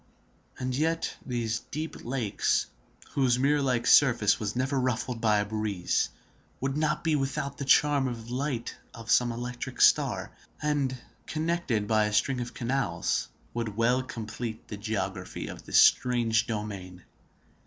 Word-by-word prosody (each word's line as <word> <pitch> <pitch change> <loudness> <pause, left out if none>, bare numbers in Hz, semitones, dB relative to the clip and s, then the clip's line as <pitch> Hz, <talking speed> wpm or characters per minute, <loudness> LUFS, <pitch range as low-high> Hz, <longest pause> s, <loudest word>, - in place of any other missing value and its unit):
And 125 0 -2
yet 160 +3 0
these 115 -3 -2
deep 155 +2 -5
lakes, 120 -5 0 0.5
whose 130 -3 +2
mirror 145 +3 +2
like 125 -3 +1
surface 120 -7 +5
was 105 0 -3
never 130 +2 0
ruffled 125 -1 -1
by 110 -2 +4
a 105 - +1
breeze, 105 -4 -1 0.5
would 135 +1 -1
not 150 0 0
be 160 -2 +2
without 140 0 -2
charm 145 0 +4
by 125 - -1
the 115 +1 -8
light 130 -3 -2 0.2
of 115 0 -5
some 120 -1 +4
electric 120 +1 -5
star, - - +4 0.3
and, 145 -3 0 0.3
connected 155 -9 -1
by 110 -1 +3
a 105 - -2
string 125 +4 +1
of 120 - -6
canals, 120 -9 -1 0.3
would 115 -3 -3
well 120 +3 +3
complete 115 -3 -6
the 105 - -5
geography 100 -3 -3
of - - -9
this - - +5
strange 115 -3 +4
domain. 100 -5 -5
120 Hz, 145 wpm, -28 LUFS, 110-135 Hz, 0.5 s, surface